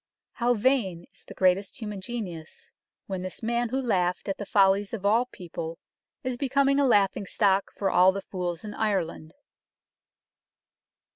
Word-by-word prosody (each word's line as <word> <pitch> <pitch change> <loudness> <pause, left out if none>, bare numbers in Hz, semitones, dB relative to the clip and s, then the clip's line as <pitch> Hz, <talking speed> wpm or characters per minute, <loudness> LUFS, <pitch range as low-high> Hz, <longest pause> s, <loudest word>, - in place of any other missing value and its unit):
How 240 0 +1
vain 205 -8 +1
is - - -19
the - - -10
greatest 190 +5 +1
human 210 -4 -5
genius, 185 -8 -6 0.3
when 190 -2 -4
this 185 +4 -7
Man 235 +1 0
who 260 +3 -1
laughed 180 -8 0
at 195 - -3
the 205 - -5
follies 200 +1 +3
of 200 -3 -8
all 230 +5 +3
People 170 -6 -7 0.5
is 255 -1 -2
becoming 275 +1 +2
a 280 - +4
laughing 200 -3 +2
Stock 195 -1 +2
for 195 - 0
all 185 +1 +6
the 195 0 -5
fools 175 -1 -4
in 210 - -6
Ireland." 180 -7 -2
200 Hz, 155 wpm, -27 LUFS, 185-235 Hz, 0.5 s, all